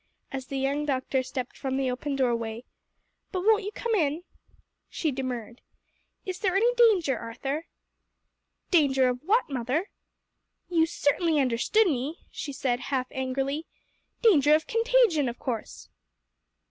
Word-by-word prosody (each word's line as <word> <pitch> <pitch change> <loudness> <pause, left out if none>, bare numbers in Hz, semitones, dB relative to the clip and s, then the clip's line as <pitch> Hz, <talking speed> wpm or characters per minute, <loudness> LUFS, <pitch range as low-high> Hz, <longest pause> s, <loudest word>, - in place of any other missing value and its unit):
as 265 -1 -5
the 275 - -4
young 275 +2 0
doctor 265 -2 0
stepped 255 -1 -5
from 265 -1 -3
the 265 -2 0
open 275 +3 -3
doorway. 235 -3 -1 0.7
"But 370 - -2
won't 435 +2 +4
you 410 - -4
come 470 +1 -3
in?" 320 -4 +1 0.7
She 315 - -1
demurred. 250 -3 -5 0.6
"Is 370 -1 -4
there 380 -2 0
any 465 +5 +4
danger, 390 - +4
Arthur?" 270 +7 -4 1.0
"Danger 270 -7 +4
of 250 0 -2
what, 430 +9 +2
mother?" 270 - -2 0.8
"You 330 -2 +3
certainly 320 0 +1
understood 265 - +3
me," 290 -1 -2
she 290 - -5
said 255 -3 -1
half 260 -1 -1
angrily; 270 +4 -2 0.6
"danger 305 - +6
of 315 - 0
contagion, 455 - +3
of 240 - -7
course." 235 -4 -5
280 Hz, 135 wpm, -27 LUFS, 255-355 Hz, 1.0 s, danger